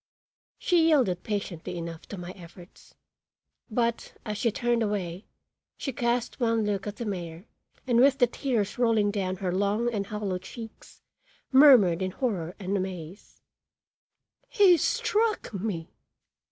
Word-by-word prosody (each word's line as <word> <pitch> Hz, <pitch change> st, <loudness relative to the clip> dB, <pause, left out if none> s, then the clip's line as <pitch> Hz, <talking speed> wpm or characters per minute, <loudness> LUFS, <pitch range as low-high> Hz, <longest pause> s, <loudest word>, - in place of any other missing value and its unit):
She 340 Hz, -3 st, +3 dB
yielded 245 Hz, -, +3 dB
patiently 185 Hz, -4 st, -4 dB
enough 165 Hz, -1 st, -7 dB
to 200 Hz, -, -7 dB
my 175 Hz, 0 st, -7 dB
efforts, 175 Hz, 0 st, -15 dB, 0.7 s
but, 235 Hz, +1 st, -1 dB
as 210 Hz, -2 st, -3 dB
she 230 Hz, -, +1 dB
turned 240 Hz, +2 st, 0 dB
away, 200 Hz, -3 st, -3 dB, 0.5 s
she 270 Hz, -, -4 dB
cast 240 Hz, 0 st, -1 dB
one 230 Hz, -3 st, +1 dB
look 205 Hz, -1 st, -2 dB
at 205 Hz, -, -4 dB
the 235 Hz, -, -5 dB
mayor 175 Hz, -3 st, -5 dB, 0.4 s
and 240 Hz, -2 st, +2 dB
with 275 Hz, +1 st, +5 dB
the 245 Hz, -, +5 dB
tears 240 Hz, -4 st, -2 dB
rolling 225 Hz, -4 st, +3 dB
down 190 Hz, -3 st, -2 dB
her 185 Hz, -1 st, -3 dB
long 205 Hz, +5 st, 0 dB
and 200 Hz, -2 st, -2 dB
hollow 205 Hz, -3 st, -3 dB
cheeks 225 Hz, +4 st, -11 dB, 0.5 s
murmured 250 Hz, -, +7 dB
in 185 Hz, -, 0 dB
horror 185 Hz, -6 st, -3 dB
and 195 Hz, 0 st, -3 dB
amaze: 185 Hz, -1 st, -6 dB, 1.1 s
"He 390 Hz, -4 st, +6 dB
struck 425 Hz, -, 0 dB
me!" 190 Hz, -5 st, -4 dB
210 Hz, 140 wpm, -27 LUFS, 185-240 Hz, 1.1 s, murmured